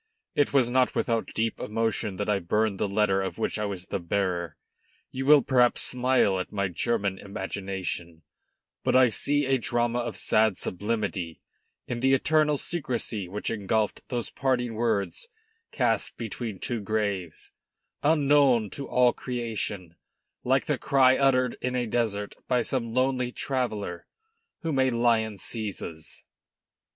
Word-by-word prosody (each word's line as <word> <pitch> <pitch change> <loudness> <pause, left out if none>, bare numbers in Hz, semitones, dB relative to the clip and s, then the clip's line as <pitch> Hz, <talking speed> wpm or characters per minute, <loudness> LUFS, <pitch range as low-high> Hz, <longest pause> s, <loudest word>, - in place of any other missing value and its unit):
It 145 - +2
was 130 -4 +3
not 130 0 +2
without 115 -1 0
deep 115 0 0
emotion 110 -2 -1
that 100 +2 -3
I 105 -2 +2
burned 105 +3 0
the - - +1
letter 100 -1 +2
of 95 - -4
which 110 - -1
I 105 - 0
was 95 -3 -4
the - - -3
bearer. 85 -3 -2 0.5
You 135 +1 -4
will 145 -2 +7
perhaps 125 -2 +3
smile 125 -6 +2
at 90 - -5
my 100 -2 -1
German 100 +1 -1
imagination, 95 -4 -5 0.6
but - - +1
I 130 -1 +6
see 145 +6 +1
a 135 0 +2
drama 120 +1 0
of 120 - -4
sad 110 -3 +2
sublimity 100 -4 -3 0.5
in 120 - -4
the 135 +2 +4
eternal 150 +1 +2
secrecy 120 - -2
which 105 +4 -3
engulfed 110 0 -1
those 120 -2 -3
parting 125 -3 0
words 110 - -1 0.4
cast 115 -5 0
between 115 -2 -4
two 120 +3 -3
graves, 100 -5 -2 0.5
unknown 140 -7 +4
to 140 - -6
all 125 -1 +4
creation, 110 -8 -4 0.5
like - - +2
the - - -1
cry 130 -1 +4
uttered 130 -2 +2
in 125 0 -1
a 125 -1 0
desert 110 -3 -1
by 125 -2 +2
some 115 -3 -2
lonely 130 0 +1
traveller 110 -11 -3 0.6
whom 155 -5 0
a 130 0 +4
lion 115 -3 +1
seizes." 95 -7 -5
115 Hz, 145 wpm, -27 LUFS, 100-125 Hz, 0.6 s, will